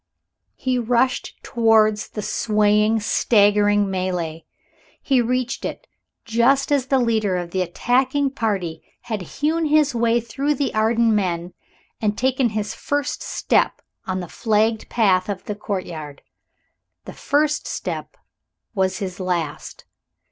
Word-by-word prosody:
he 255 -1 -1
rushed 245 +2 0
towards 220 -3 +3
the 210 - -6
swaying, 210 +1 +2
staggering 205 -1 +3
mêlée. 180 -4 -3 0.5
He 265 -3 +2
reached 250 +1 -1
it - - -5 0.4
just 255 +5 +2
as 275 -3 +2
the 270 - +3
leader 220 -6 +1
of 175 -1 -5
the 185 - 0
attacking 260 +9 +1
party 195 - -2 0.2
had 220 -4 -4
hewn 310 - -1
his 300 -2 +3
way 235 0 +2
through 275 +6 -2
the 280 0 -1
Arden 225 +1 +2
men 180 -4 -1 0.5
and 210 -1 0
taken 260 -1 +1
his 210 -1 -3
first 290 -1 -2
step - - +1 0.3
on 185 0 -2
the 175 - -6
flagged 220 +3 0
path 190 -5 +2
of 195 -2 -4
the 210 - -3
courtyard. 175 -8 -6 0.8
The - - -8
first 300 +1 0
step - - -5 0.6
was 190 -3 0
his 190 -2 -5
last. 170 -5 -3
220 Hz, 130 wpm, -22 LUFS, 190-250 Hz, 0.8 s, towards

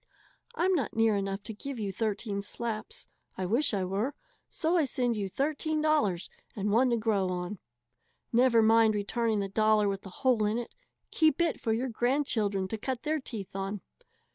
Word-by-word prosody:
I'm 370 +3 +2
not 280 -10 -1
near 225 -1 +3
enough 195 0 -2
to 220 - -6
give 270 +5 -6
you 205 -3 -2
thirteen 205 0 -2
slaps 230 - -4 0.3
I 190 - -2
wish 240 +10 +1
I 200 -4 0
were 205 +10 -2 0.3
so 335 +1 0
I 335 - +4
send 245 -3 0
you 200 -2 -2
thirteen 310 - -1
dollars, 295 - +1 0.3
and 205 0 -1
one 245 +4 +4
to 235 - +2
grow 210 -4 +1
on. 180 +2 -4 0.7
Never 235 -1 +5
mind 220 0 +5
returning 215 +1 0
the 195 - -2
dollar 215 +1 +3
with 195 -1 -2
the 195 - -10
hole 240 +3 +1
in 210 +2 +1
it 240 - -5 0.4
keep 315 -2 +3
it 340 -2 +1
for 225 - 0
your 245 +4 0
grandchildren 225 -6 0
to 220 - -4
cut 255 +1 -3
their 310 0 0
teeth 215 -9 -7
on. 195 +1 -3
225 Hz, 185 wpm, -29 LUFS, 200-260 Hz, 0.7 s, Never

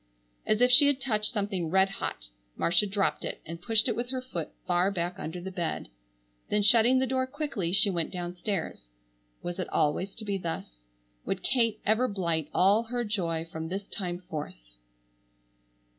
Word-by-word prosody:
As 215 +2 +2
if 250 0 +5
she 280 +3 +9
had 285 -2 +2
touched 215 -5 +1
something 200 -6 -2
red 190 +2 +3
hot - - -4 0.3
Marcia 175 +5 +3
dropped 195 0 0
it, - - -4
and 165 +1 -8
pushed 225 +2 +3
it 235 - 0
with 240 +1 -3
her 260 0 -1
foot 215 -11 -5 0.2
far 180 +1 +2
back 175 -2 -3
under 160 +3 -5
the 190 +2 -6
bed. 175 - -3 0.6
Then 210 0 +1
shutting 235 +4 +6
the 260 - +2
door 260 0 -1
quickly 265 - -3
she 200 +2 +4
went 170 -3 -1
downstairs. 175 - -4 0.5
Was 175 +1 -5
it 185 - -3
always 180 +6 0
to 220 - -6
be 200 -1 -2
thus? 165 - -5 0.5
Would 195 - -3
Kate 230 -4 +2
ever 220 +4 +3
blight 170 - -1
all 205 +5 +3
her 240 +1 -2
joy 170 -7 -2
from 160 -1 -6
this 195 +3 -5
time 180 -4 -3
forth? 145 - -8
195 Hz, 175 wpm, -28 LUFS, 175-225 Hz, 0.6 s, she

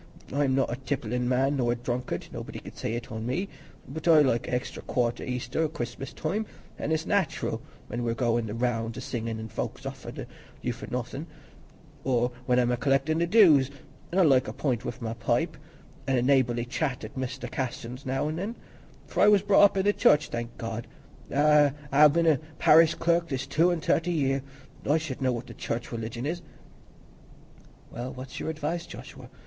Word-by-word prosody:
I'm 140 -2 +2
not 135 -3 +1
a - - -4
tipplin' 125 -3 -2
man 135 +3 +2
nor 120 -2 +2
a - - -2
drunkard—nobody 120 +1 -4
can - - -10
say - - -3
it 120 0 -6
on 110 +1 -4
me—but 160 -1 -6
I 160 -2 +8
like 125 -5 +2
a - - -4
extry 125 - -4
quart 120 -1 0
at - - -6
Easter 125 +3 -2
or - - -1
Christmas 125 -2 -5
time, 205 +7 -2 0.3
as - - -2
is 160 +1 0
nat'ral 200 -6 0 0.3
when 120 - -4
we're 115 -1 0
goin' 120 -2 +1
the 105 - -4
rounds 115 -1 -1
a - - -4
singin', 115 -3 -3
an' 110 0 -6
folks - - -5
offer't - - -6 0.4
you - - 0
for - - -9
nothin'; - - -4 0.8
or 125 -2 +1 0.2
when 125 -1 +3
I'm 125 -1 +3
a 125 - +1
collectin' 135 +5 +2
the 170 - +2
dues; 165 - +6 0.4
an' 180 - -1
I 190 - +6
like 135 -5 +4
a - - -4
pint 125 -6 -1
wi' - - -3
my 115 -1 -2
pipe, 155 +9 0 0.5
an' 135 -1 +2
a 120 - +2
neighbourly 125 -3 +3
chat 130 0 -2
at 110 - -8
Mester 130 -2 -4
Casson's 125 0 -4
now 135 +3 -1
an' 155 +1 -3
then, 205 +6 -3 0.5
for - - -2
I - - +7
was 205 -2 +6
brought 205 0 +7
up 200 - +2
i' 190 - +2
the 205 +1 +3
Church, 150 - +4
thank 120 0 -5
God, 115 0 -5 0.4
an' 145 0 +4 0.2
ha' 150 +1 +8
been 170 +2 +2
a 160 -3 +5 0.2
parish 160 +1 +6
clerk 170 0 +2
this 135 -3 -2
two 170 +3 +3
an' 170 -2 -1
thirty 165 +2 +1
year: 135 -4 +1 0.4
I 150 +3 +3
should 155 -5 -5
know 130 -1 +2
what 120 0 -3
the - - -10
church 120 +1 -4
religion 115 +1 -4
is." 170 +4 -2 1.5
"Well, 120 +2 -5
what's 130 0 -8
your - - -3
advice, 160 +2 -3
Joshua? - - -10
135 Hz, 200 wpm, -28 LUFS, 120-155 Hz, 1.5 s, I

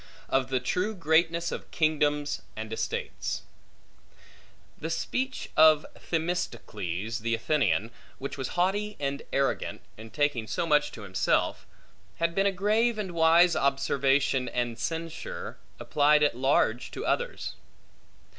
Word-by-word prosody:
Of 135 -1 +1
the 130 -1 +1
True 185 - -1
Greatness 170 0 +2
Of - - -6
Kingdoms 150 -2 +1
And 110 0 -5
Estates - - -3 1.4
THE 160 - -4
speech 260 +10 -2
of 155 -1 +6
Themistocles 115 - -3
the 115 +1 0
Athenian, 115 - +1 0.3
which 140 - -5
was 135 +4 -5
haughty 205 +4 0
and 140 0 -2
arrogant, 135 0 -1 0.2
in 110 +1 -10
taking 145 -5 0
so 140 +10 -1
much 150 -2 +3
to 115 - -9
himself, 95 -2 0 0.5
had 170 +1 0
been 195 +3 +2
a - - +3
grave 215 +5 +2
and 200 -4 -3
wise 170 +1 +5
observation 135 -1 +2
and 120 -2 -2
censure, 165 0 -5 0.2
applied 150 0 +3
at 145 - +2
large 125 -2 +1
to - - -6
others. 485 0 -1
150 Hz, 125 wpm, -28 LUFS, 125-170 Hz, 1.4 s, of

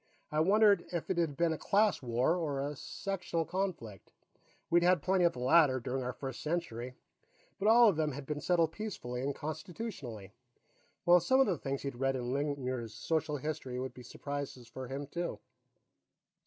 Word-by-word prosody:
I 150 - +1
wondered 200 +2 +5
if 175 +1 -2
it 175 - 0
had 155 -5 0
been 170 -1 +2
a 155 - -5
class 205 0 +2
war, 125 +6 +1
or 150 -6 -2
a 145 +2 -2
sectional 175 +1 -3
conflict. 170 - -4 0.6
We'd 175 +1 +4
had 175 -3 +3
plenty 185 -1 +3
of 170 - +3
the 125 - -8
latter, 130 0 +5
during 130 +2 -3
our 125 - -2
first 130 -1 -6
century, 130 -7 -3 0.6
but 200 - +1
all 235 +2 +8
of 195 -7 +3
them 155 -2 0
had 140 +1 -7
been 150 +1 -3
settled 170 -3 +2
peacefully 160 - -5
and 140 +1 -2
Constitutionally. 155 - -6 0.7
Well, 175 0 +7
some 260 +10 +3
of 270 - +6
the 190 - +1
things 135 0 -3
he'd 140 - -3
read 135 +1 +1
in 125 0 -2
Lingmuir's 130 -6 -2
Social 155 +5 -1
History 135 -3 -4
would 130 0 -4
be 125 - -11
surprises 135 0 -6
for 130 +2 -7
him, 135 +3 -4
too. 170 +5 -4
150 Hz, 180 wpm, -32 LUFS, 130-175 Hz, 0.7 s, all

